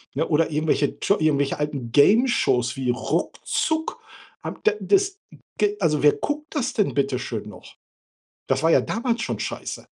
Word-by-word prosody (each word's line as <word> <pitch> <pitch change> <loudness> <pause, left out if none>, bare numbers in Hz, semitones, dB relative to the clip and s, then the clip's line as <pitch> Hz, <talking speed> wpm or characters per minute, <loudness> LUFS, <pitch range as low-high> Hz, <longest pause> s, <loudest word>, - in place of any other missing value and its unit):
Ja 160 - +1
oder 160 0 +2
irgendwelche 150 -1 0
Tscho 200 - +2
irgendwelche 145 -2 +1
alten 140 -5 -3
Gameshows 150 - +3
wie 130 -2 -2
Ruckzuck, 315 - -2 0.4
habe - - -6
d 435 - +5
das 395 0 +1 0.4
g 210 0 +1
also 155 -5 +1
wer 145 - +6
guckt 300 +2 -4
das 260 -3 -1
denn 210 -4 +1
bitteschön 130 -6 -2
noch? - - -14 0.7
Das - - 0
war 165 - +3
ja - - +5
damals 235 0 -2
schon - - -3
scheiße. - - -5
160 Hz, 155 wpm, -23 LUFS, -, 0.7 s, wer